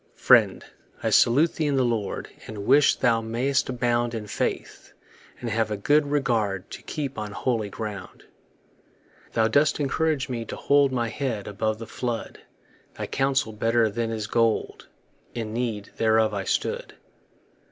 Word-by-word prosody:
riend, - - +5 0.4
I - - +1
salute 145 +8 +4
thee 155 -3 -1
in 145 - +1
the 130 -1 +3
Lord, 115 -4 -2 0.2
And 105 -2 -7
wish 145 +4 +5
thou 115 -2 +2
may'st 120 +6 0
abound 120 -1 0
In 110 -2 -4
faith, 105 - -4 0.5
and 120 -2 -4
have 110 0 0
a 105 - -2
good 145 +7 +2
regard 115 -9 0
To - - -8
keep 140 -6 -4
on 105 -1 -5
holy 115 -3 -1
ground. 100 -3 -7 1.1
Thou 110 -1 +3
dost 145 +8 +2
encourage 150 0 0
me 120 -3 -3
to - - -6
hold 140 -1 +3
My 120 -3 -1
head 120 -5 -3
above 110 +1 -1
the 115 - -7
flood; 120 0 -4 0.6
Thy - - -4
counsel 135 -4 0
better 115 +2 +2
is 110 -2 0
than 115 0 -2
gold: 115 -2 0 0.5
In 110 -2 -4
need 115 -4 -3
thereof 110 -1 +3
I 100 -1 -3
stood. - - -2
115 Hz, 155 wpm, -25 LUFS, 110-135 Hz, 1.1 s, riend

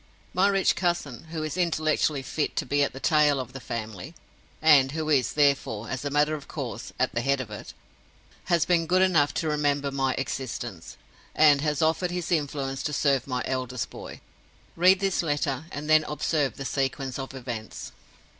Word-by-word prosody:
My 190 +2 +4
rich 195 -1 +2
cousin 170 -8 -2
(who 160 -1 -5
is 155 0 -3
intellectually 155 -5 +1
fit 150 +3 -2
to - - -1
be 145 0 +1
at 140 - +2
the 135 - -9
tail 150 -1 +3
of 125 -1 -6
the 135 - -6
family, 110 - -6 0.4
and 145 -4 +5
who 155 -1 -2
is, 140 -4 +2
therefore, 140 -7 +1
as 130 - -3
a 145 - -2
matter 150 +2 +2
of 150 -2 -6
course, 120 -7 -6
at 130 - +1
the 115 - 0
head 140 +2 +1
of 120 -5 -6
it) 105 - -9 0.7
has 170 -3 +2
been 170 -2 +2
good 185 +2 +4
enough 160 -6 +3
to 160 - -1
remember 145 -2 0
my 135 -1 0
existence; 130 -2 -5 0.4
and 150 -2 +6
has 150 -1 0
offered 165 +3 +1
his 175 -1 -4
influence 140 -4 -1
to 150 - -3
serve 140 -3 +1
my 125 -2 -2
eldest 130 -4 -3
boy. - - -9 0.5
Read 185 +2 +5
his 195 -2 +1
letter, 145 -2 -1
and 145 +1 -6
then 155 0 +5
observe 150 -1 -1
the 135 - -5
sequence 135 0 -2
of 135 0 -6
events. 120 -4 -6
145 Hz, 185 wpm, -26 LUFS, 135-155 Hz, 0.7 s, and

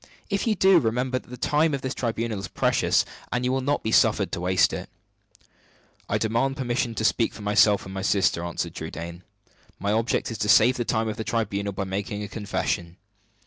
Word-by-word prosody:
If 200 +3 0
you 220 - +2
do, 190 -2 +5
remember 125 +1 0
that - - -21
the 125 - -8
time 150 +4 +2
of 135 - -6
this 130 +1 -2
tribunal 115 -3 -2
is 95 - -5
precious, - - +2 0.3
and 125 0 -1
that - - 0
you 125 - +1
will 135 0 0
not 145 +2 0
be 110 - -1
suffered - - +3
to 85 - -3
waste 90 0 +3
it." - - -5 1.2
"I - - +1
demand 115 +5 0
permission 120 -3 -1
to 110 - -1
speak 115 +2 +1
for 105 - -9
myself 105 0 +4
and - - -11
for - - -9
my 95 0 -5
sister," 95 -3 +1
answered 85 -1 -3
Trudaine. 85 +1 -7 0.6
"My 100 +1 -1
object 115 +2 0
is 110 - -6
to 105 - -1
save 125 +4 +6
the 120 - -2
time 110 0 0
of 110 +1 -3
the 110 - -3
tribunal 100 -2 -1
by 95 - -3
making 100 +2 -4
a - - -4
confession." 95 -4 -3
110 Hz, 220 wpm, -25 LUFS, 100-125 Hz, 1.2 s, save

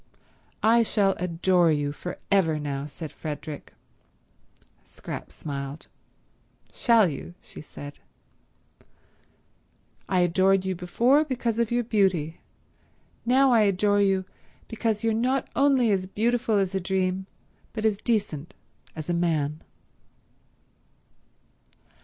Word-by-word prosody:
"I 230 +2 +5
shall 205 -3 +2
adore 175 0 +2
you 145 -1 0
for 180 +4 -7
ever 170 -6 +3
now," 145 -1 -4
said 150 +1 -8
Frederick. 150 -1 -7 1.1
Scrap - - -8
smiled. 140 0 -6 0.8
"Shall 230 -5 +4
you?" 165 +3 -6
she - - -11
said. 145 -1 -10 2.1
"I 185 -2 +3
adored 185 +2 +3
you 190 - 0
before 235 - +2
because 245 -5 -2
of 235 -2 +1
your 240 0 +1
beauty. 190 -8 0 0.9
Now 265 +2 +5
I 230 -2 +5
adore 205 0 +3
you 190 -1 +2 0.4
because 225 -1 -2
you're 225 -1 +2
not 255 +4 0
only 270 -5 +4
as 190 -2 0
beautiful 225 +2 +1
as 195 -1 0
a 190 - 0
dream 190 0 -1 0.4
but 220 -1 -4
as 215 -2 +2
decent 195 - -2 0.4
as 155 -2 -6
a 175 - 0
man." 155 -3 0
190 Hz, 115 wpm, -26 LUFS, 165-225 Hz, 2.1 s, I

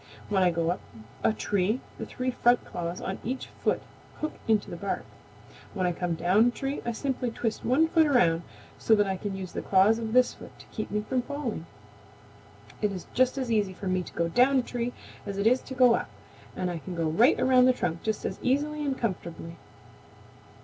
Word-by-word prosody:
When 195 -2 +2
I 180 - +5
go 165 0 0
up 180 - -4 0.4
a 225 - +4
tree 210 +1 0 0.2
the - - -5
three 255 0 -2
front 240 0 +3
claws 170 +1 -4
on 190 - -4
each 260 +3 -4
foot - - +1 0.4
hook 310 - -2
into 220 -2 +2
the - - -4
bark. 195 +3 -3 0.7
When 185 -2 0
I 180 - +2
come 175 0 -2
down 190 +8 +4
a - - +5
tree 270 +3 -3
I - - +1
simply 255 +1 -2
twist 225 -1 -3
one 285 +7 +3
foot 320 -1 +4
around 175 - +3 0.4
so 220 - +4
that 205 -1 +3
I 190 -1 -1
can 195 +1 -4
use 185 -2 -6
the - - -4
claws 200 +4 +4
of 225 -1 -4
this 250 0 +4
foot - - -13
to - - -14
keep 215 - -4
me 210 +1 -1
from 255 -1 +1
falling. 245 - -4 1.1
It 210 -1 +1
is 185 -3 -6
just 255 +1 +2
as 255 -3 -2
easy 205 -4 +1
for 195 - -9
me 185 -1 +1
to - - -10
go 170 - 0
down 250 +10 +4
a 255 - +2
tree 245 0 -3 0.4
as 200 -1 -4
it 200 - -1
is 250 +3 +4
to 260 - -8
go 250 -2 +6
up, - - -1 0.5
and 180 -1 -2
I 170 - -4
can 180 +3 -7
go 165 -1 -1
right 220 - +4
around 255 -1 +5
the 255 - +6
trunk 170 -8 -2
just 220 -1 -2
as - - -3
easily 295 +4 0
and 275 -2 -1
comfortably." 170 -6 -4
220 Hz, 220 wpm, -28 LUFS, 185-255 Hz, 1.1 s, go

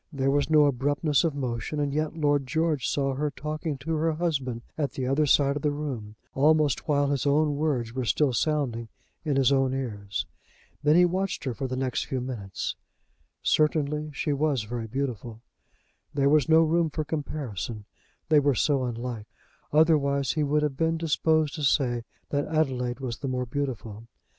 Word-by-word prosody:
There 135 -2 0
was 145 +2 +1
no 155 -2 +6
abruptness 145 +3 +1
of 160 -4 0
motion, 130 +2 -3
and 145 -1 -1
yet 155 +2 -1
Lord 145 -3 +1
George 155 -1 0
saw 135 -1 0
her 150 +3 -1
talking 155 +1 -4
to 155 +5 -4
her 160 +1 +1
husband 135 -8 -2
at 145 -4 -2
the 130 - -3
other 140 +4 +2
side 140 0 +4
of 145 - -3
the 150 - +2
room, 135 -8 -5 0.2
almost 150 -1 +3
while 145 -2 +2
his 140 0 0
own 145 +1 +3
words 135 -7 -1
were 130 0 -2
still 135 +3 +2
sounding 125 -5 0 0.4
in 150 -4 0
his 135 -1 +4
own 135 -1 +2
ears. 105 -6 -3 0.6
Then 150 +1 +4
he 180 +1 +7
watched 185 0 -1
her 130 -4 -2
for 135 +3 -4
the 130 - -3
next 130 -1 -1
few 130 - -2
minutes. 120 -7 -4 0.7
Certainly, 150 0 +1
she 145 +1 -1
was 140 -4 +1
very 115 +1 -5
beautiful. 120 -2 -4 0.7
There 140 -1 +3
was 150 0 +3
no 160 0 +7
room 165 +1 +2
for 155 +1 -3
comparison, 120 - -4 0.4
they 155 -1 +5
were 140 -2 +2
so 135 +2 +2
unlike; 120 -2 -5 0.4
otherwise, 140 -4 +3
he 155 - -1
would 150 +1 +1
have 140 -3 -1
been 165 +1 +1
disposed 155 -2 +1
to 155 - -5
say 125 -5 +1 0.3
that 145 0 0
Adelaide 130 -5 -1
was 120 -4 -4
the 140 - -4
more 125 -1 -1
beautiful. 115 -5 -4
140 Hz, 180 wpm, -27 LUFS, 125-150 Hz, 0.7 s, he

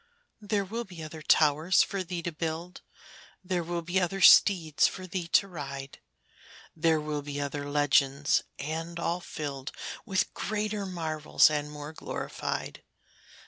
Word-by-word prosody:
There 205 -1 -1
will 230 +5 -4
be 180 -6 -10
other 155 0 -8
towers 155 +3 +4
for 195 -2 -3
thee 175 -1 -5
to 175 - -2
build; 165 +2 -5 0.6
There 180 -1 -1
will 170 0 -3
be 175 +3 +1
other 185 +2 -1
steeds 175 -5 +6
for 185 - -6
thee 180 -2 -4
to 195 - +3
ride; 140 -6 -7 0.8
There 160 -1 +2
will 150 -1 -3
be 145 0 -5
other 145 0 -3
legends, 145 0 +3 0.2
and 165 +4 -4
all 170 +1 -1
filled 140 -5 -5 0.3
With 195 -4 0
greater 210 -1 -2
marvels 155 -4 +2
and 150 -1 -2
more 150 +1 -8
glorified. - - -5
165 Hz, 140 wpm, -29 LUFS, 150-185 Hz, 0.8 s, steeds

